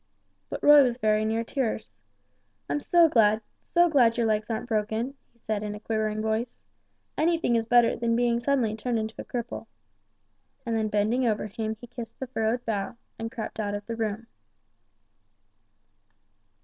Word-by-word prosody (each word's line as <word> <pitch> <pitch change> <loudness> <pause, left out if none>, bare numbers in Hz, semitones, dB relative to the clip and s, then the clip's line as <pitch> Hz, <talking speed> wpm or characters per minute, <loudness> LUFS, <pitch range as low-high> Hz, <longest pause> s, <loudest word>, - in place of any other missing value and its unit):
But - - -6
Roy 295 0 +9
was 245 -3 +1
very 215 -3 +2
near 225 +1 0
tears. 230 - -3 0.7
"I'm 145 +1 -1
so 340 - +5
glad 215 -6 +4 0.3
so 345 0 +5
glad 245 -7 +4
your 235 - +2
legs 215 0 0
aren't 230 +2 -3
broken," 220 +3 -1 0.2
he - - -33
said, 215 -2 -3
in 210 -1 -4
a - - -8
quivering 215 0 -2
voice, 220 +2 -2 0.6
"anything 325 -6 +2
is 225 -1 0
better 240 0 +5
than 230 0 0
being 235 0 +2
suddenly 240 -4 +1
turned 235 +2 -2
into 220 0 -3
a - - -8
cripple!" 240 -1 -5 1.0
And 230 -1 -1
then 220 -1 +1
bending 215 +5 +1
over 215 -2 0
him 220 +1 -4
he 240 - -10
kissed 240 -1 -9
the 265 - -3
furrowed 240 -1 -1
brow, 210 0 -2 0.2
and 225 0 -4
crept 225 -1 -6
out 205 -1 -1
of 205 0 -6
the 230 - -4
room. 220 0 -3
225 Hz, 170 wpm, -27 LUFS, 215-245 Hz, 1.0 s, Roy